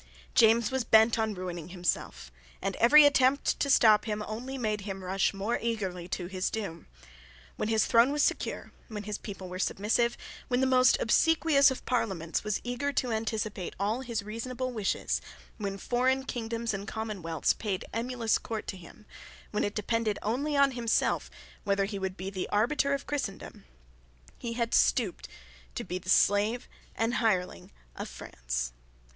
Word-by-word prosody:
James 230 0 +5
was 265 -2 0
bent 220 +1 +5
on 220 -2 0
ruining 175 -3 -5
himself; 175 - -3 0.3
and - - -2
every 290 +6 +8
attempt 280 -1 +3
to 280 - 0
stop 215 -5 +6
him 210 -1 -2
only 250 +5 -5
made 215 -4 -1
him 195 -1 -6
rush 190 +1 +1
more 200 +4 -2
eagerly 190 -7 -3
to 180 0 -3
his 185 +1 -2
doom. 200 -7 -5 0.7
When 215 - -2
his 220 -1 +3
throne 235 +4 +5
was 295 0 +1
secure, - - -1 0.2
when 210 -3 -6
his 210 0 -4
people 195 -3 -8
were 180 +1 -6
submissive, 225 +5 +1 0.3
when 250 0 +1
the 265 - +3
most 255 -1 +5
obsequious 300 +3 +4
of 265 - -6
Parliaments 190 -9 -1
was 210 -1 -1
eager 245 +4 -2
to 250 -2 0
anticipate 220 -4 -3
all 215 +5 0
his 235 -5 -3
reasonable 250 +4 -4
wishes, 215 -5 -1 0.4
when 200 -2 -4
foreign 255 +5 +1
kingdoms 230 -2 -3
and 195 +1 -5
commonwealths 195 -9 -1
paid 200 -4 -3
emulous 235 -1 0
court 220 -2 -5
to 190 - -4
him, 185 +4 -14 0.5
when 210 - 0
it 205 - -2
depended 220 0 0
only 280 +7 -1
on 280 -1 +5
himself 235 -3 0 0.3
whether 200 -1 +1
he 200 0 -5
would 190 0 -3
be 190 +1 -5
the 185 -2 -4
arbiter 280 +6 +2
of 275 - -6
Christendom, 275 -9 -5 0.7
he 235 -1 -4
had 235 -1 -2
stooped 215 -8 +2 0.5
to - - -3
be 180 +1 -4
the 185 0 -10
slave 205 +5 +3 0.3
and 225 +1 0
the - - -1
hireling 190 -6 0 0.3
of - - -6
France. - - -4
220 Hz, 165 wpm, -29 LUFS, 195-245 Hz, 0.7 s, every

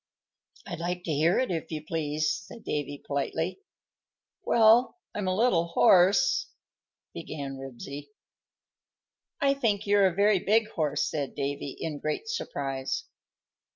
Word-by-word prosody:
"I'd - - -6
like 175 +1 -3
to 165 - -2
hear 160 +5 +3
it, 255 -6 +1
if 165 -1 -3
you 155 -1 -5
please," 155 -1 -1 0.2
said 230 - -12
Davy, 145 -1 -4
politely. 160 - -2 0.8
"Well, 230 +6 +5 0.2
I'm 205 -2 -3
a 185 - +1
little 185 -6 +2
hoarse," 180 +3 +4 0.6
began 135 - -6
Ribsy. 135 +2 -8 1.3
"I 275 -1 +4
think 220 -7 0
you're 200 -1 +5
a 180 - -2
very 200 0 +4
big 215 +3 +2
horse," 150 -6 0
said 145 -3 -3
Davy, 140 -1 -3
in 150 -3 -4
great 155 - -3
surprise. 135 - -3
165 Hz, 130 wpm, -28 LUFS, 145-205 Hz, 1.3 s, Well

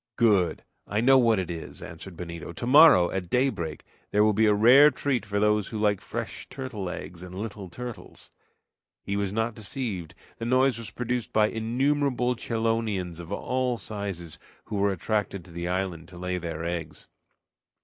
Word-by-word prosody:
"Good! 100 -9 +3 0.2
I 105 - -1
know 130 +3 +6
what 115 -3 +4
it 90 -2 -2
is," 85 -2 -8
answered 85 +2 -9
Benito. 85 -1 -7
"Tomorrow, 125 - +6
at 90 -3 -3
daybreak, 125 - 0 0.3
there 105 - +3
will 105 0 +4
be 110 +2 +3
a - - +5
rare 125 +8 +8
treat 130 -5 -2
for 100 0 -1
those 105 -1 +2
who 110 - -5
like 105 -2 +1
fresh - - -6
turtle 120 -8 -5
eggs 90 -1 -7
and 90 0 -9
little 100 -2 -6
turtles!" 120 +5 -9 0.7
He 100 - -3
was 100 -1 -1
not 110 +2 -1
deceived; 105 - -4 0.2
the 115 - -3
noise 130 0 +3
was 115 -2 -7
produced 125 -1 -3
by 110 0 +3
innumerable 125 +2 0
chelonians 110 -7 -1
of 85 +2 -9
all 125 +3 -1
sizes, 95 -8 -5 0.3
who 105 - -4
were 100 0 +2
attracted 100 -1 -2
to 90 - -14
the 85 +1 -4
islands 90 -2 -3
to 90 - -12
lay 90 0 -2
their 85 -1 -5
eggs. 85 -3 -5
105 Hz, 170 wpm, -27 LUFS, 90-120 Hz, 0.7 s, rare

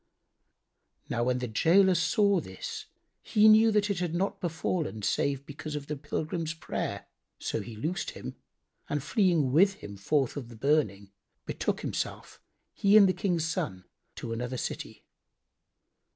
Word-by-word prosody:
Now 120 - 0
when 125 0 +1
the 125 0 -3
gaoler 180 - +4
saw 200 +4 +3
this, 95 - -7 0.3
he 215 0 +4
knew 220 +1 +7
that 210 -1 +2
it 195 - -2
had 175 -2 -2
not 195 +2 -1
befallen 160 - -2
save 140 +5 0
because 150 +1 -7
of 145 -1 -4
the 150 - -4
pilgrim's 155 +3 -3
prayer; 160 - -4 0.3
so - - -3
he 115 - -8
loosed 165 - -2
him - - -7 0.5
and 145 -2 -1
fleeing 170 - +2
with 195 +7 +5
him 100 - -9
forth 135 +6 0
of 125 -5 -6
the 120 - -11
burning, 110 -7 0 0.3
betook - - -2
himself, - - -4 0.3
he 200 +1 +5
and 200 -2 +8
the 185 - +2
King's 175 -5 0
son, 95 - -3 0.3
to 115 - -5
another 125 +2 -3
city. - - -5
155 Hz, 150 wpm, -29 LUFS, 125-185 Hz, 0.5 s, and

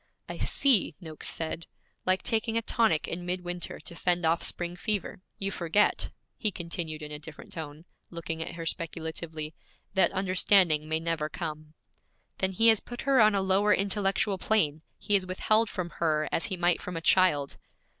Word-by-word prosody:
'I - - -7
see,' 240 - +4
Noakes 160 -4 -5
said; 165 0 -2 0.4
'like 185 0 +2
taking 225 0 0
a 230 - 0
tonic 220 -10 +2
in 175 +1 -4
midwinter 175 0 -4
to - - -6
fend 175 -1 +1
off 165 +1 +2
spring 175 0 0
fever. 205 -1 -2 0.2
You 195 0 -2
forget,' 185 +3 +1 0.3
he 215 - +1
continued 165 -4 -5
in 150 - -7
a 150 - -5
different 155 0 -11
tone, 155 0 -7 0.2
looking 165 -1 -5
at 165 - -5
her 165 -1 -6
speculatively, 160 -1 -4 0.4
'that 190 - +4
understanding 185 -5 +3
may 160 0 +1
never 165 -2 -1
come.' 155 -2 -6 0.6
'Then 190 0 0
he 225 +5 +5
has 220 -2 +5
put 240 +1 -8
her 275 -3 +4
on 215 -1 +5
a 195 - +2
lower 200 +2 +3
intellectual 195 0 0
plane; 160 -9 +1 0.2
he 205 - -3
has 190 -2 +3
withheld 215 +4 +2
from 175 -2 -4
her, 155 -2 0
as - - 0
he 190 - -3
might 175 0 +2
from 180 -2 -5
a - - -4
child.' 165 -6 +3
175 Hz, 175 wpm, -28 LUFS, 160-195 Hz, 0.6 s, he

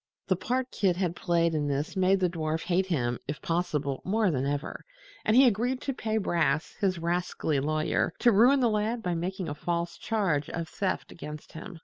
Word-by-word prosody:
The 185 - +4
part 255 +7 -2
Kit 190 -4 +1
had 175 -2 -1
played 170 -1 +1
in 150 -2 0
this 145 +5 -2
made 190 +1 +3
the 180 - +4
dwarf 160 -2 -2
hate 185 +1 +1
him, 125 -9 -1
if 145 +2 -4
possible, 150 -5 -1
more 210 0 +2
than 135 -2 -1
ever, 145 +1 -3 0.4
and 215 - +2
he 265 +2 +8
agreed 245 +3 +1
to 275 - -2
pay 220 -3 -2
Brass, 160 -7 +1
his 190 -3 +2
rascally 170 -3 -1
lawyer, 155 +2 0
to 240 - +4
ruin 245 +7 +5
the 245 - +4
lad 220 +2 -1
by 180 - 0
making 180 +2 -3
a 145 - -3
false 170 +2 -3
charge 180 -10 0
of 165 -1 -4
theft 190 +2 -2
against 150 -2 -9
him. 170 +2 -9
175 Hz, 200 wpm, -28 LUFS, 155-205 Hz, 0.4 s, he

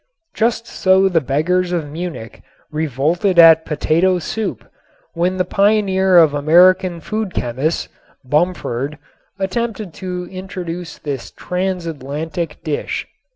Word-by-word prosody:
Just 230 +1 0
so 190 -3 +3
the 175 -4 +2
beggars 175 +7 0
of 165 -4 -1
Munich 160 -8 -6 0.3
revolted 155 - 0
at 165 -1 +8
potato 165 +4 +2
soup 210 +6 -4 0.5
when 180 +2 0
the 185 - +1
pioneer 190 -1 +3
of 160 -4 +6
American 175 +4 +4
food 215 +2 -4
chemists, 130 +7 -1 0.4
Bumford, 145 -3 -1 0.4
attempted 205 -1 -3
to 180 -1 -4
introduce 180 -2 -6
this 140 -4 -5
transatlantic 165 -3 -4
dish. 155 -3 -3
175 Hz, 110 wpm, -18 LUFS, 155-190 Hz, 0.5 s, at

